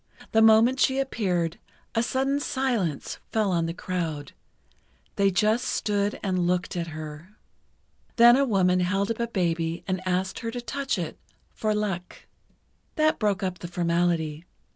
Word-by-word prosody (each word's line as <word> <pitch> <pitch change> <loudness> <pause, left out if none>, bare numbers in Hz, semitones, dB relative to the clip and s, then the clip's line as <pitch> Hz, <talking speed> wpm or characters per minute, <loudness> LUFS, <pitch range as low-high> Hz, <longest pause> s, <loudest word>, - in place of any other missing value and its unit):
The 220 - +4
moment 225 +4 +6
she 265 +1 +3
appeared, 185 -11 -1 0.3
a 225 - +2
sudden 270 +4 0
silence 245 - -2
fell 215 -3 +1
on 170 -2 +1
the - - -2
crowd—they 175 +3 -5
just 215 +6 +2
stood 205 -1 -1
and 185 -3 0
looked 180 0 -1
at 170 -1 -2
her. 155 +4 -8 0.8
Then 240 0 +8
a 275 - +3
woman 185 -7 +2
held 195 +4 0
up 230 - -4
a 235 - 0
baby 170 -5 -1
and 185 -1 -1
asked 185 +1 -1
her 230 - -4
to 245 +2 -4
touch 275 -1 -2
it 170 -4 -5 0.3
"for 215 -1 -1
luck." 195 -4 -4 0.7
That 310 -1 +2
broke 205 -2 0
up 185 -1 -2
the 175 - -6
formality. 170 -2 0
190 Hz, 150 wpm, -26 LUFS, 175-225 Hz, 0.8 s, Then